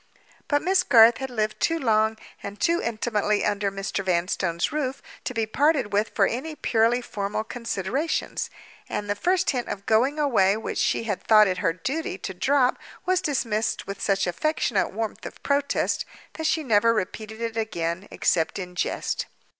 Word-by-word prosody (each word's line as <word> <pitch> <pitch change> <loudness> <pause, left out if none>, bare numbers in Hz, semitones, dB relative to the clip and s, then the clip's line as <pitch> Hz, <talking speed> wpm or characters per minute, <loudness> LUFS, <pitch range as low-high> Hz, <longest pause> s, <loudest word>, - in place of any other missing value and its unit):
But 290 -1 +1
Miss 370 +2 +3
Garth 235 -8 +6
had 265 0 -4
lived 215 -3 -2
too 330 - +1
long 220 -5 +2 0.2
and 200 +1 -7
too 340 0 +2
intimately 215 -2 0
under 205 -1 0
Mr. 195 0 -3
Vanstone's 170 -1 0
roof 275 -3 -2 0.3
to 255 - -2
be 225 -1 +1
parted 275 -1 +1
with 210 +2 +2
for 200 - +4
any 285 +9 -3
purely 235 -1 +2
formal 205 0 -3
considerations; 235 - -2 0.4
and 205 - -3
the 205 - +1
first 360 - +1
hint 250 -3 -2
at 200 0 -5
going 250 +7 +2
away 215 -9 +3
which 225 - -4
she - - +1
had 205 -5 -3
thought 215 -1 +6
it 185 -2 -1
her 165 -5 +1
duty 265 - -3
to 190 - -6
drop 260 +6 +2 0.3
was 370 0 +2
dismissed 225 -7 -1
with 200 0 -6
such 195 -1 +1
affectionate 210 - 0
warmth 220 +1 -4
of - - -9
protest 280 0 +1 0.3
that 320 -1 -2
she 315 0 +1
never 230 -2 +3
repeated 215 +2 -4
it 230 -1 -3
again, 185 -4 -2
except 165 -2 0
in 180 -2 -6
jest. 180 - -2
220 Hz, 170 wpm, -25 LUFS, 200-265 Hz, 0.4 s, Garth